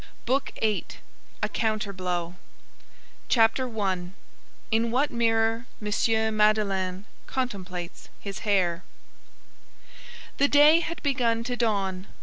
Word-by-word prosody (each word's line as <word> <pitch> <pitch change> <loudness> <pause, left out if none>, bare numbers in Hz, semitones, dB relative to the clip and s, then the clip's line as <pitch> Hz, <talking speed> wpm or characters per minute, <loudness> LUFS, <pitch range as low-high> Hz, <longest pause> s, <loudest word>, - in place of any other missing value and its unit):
BOOK 265 +3 0
EIGHTH—A 215 -2 -4
COUNTER 215 -2 -1
BLOW 180 -2 -3 1.0
CHAPTER 240 +2 +3
I—IN 195 +4 -3
WHAT 265 +5 +1
MIRROR 225 0 +1
M. 220 +1 +1
MADELEINE 200 -3 +1 0.2
CONTEMPLATES 185 -9 -5
HIS 200 -1 -6
HAIR 185 -4 +1 1.6
The 280 - +5
day 295 +3 +7
had 335 0 -5
begun 240 -5 +1
to 245 +1 -3
dawn. 195 -5 -1
220 Hz, 95 wpm, -26 LUFS, 190-235 Hz, 1.6 s, day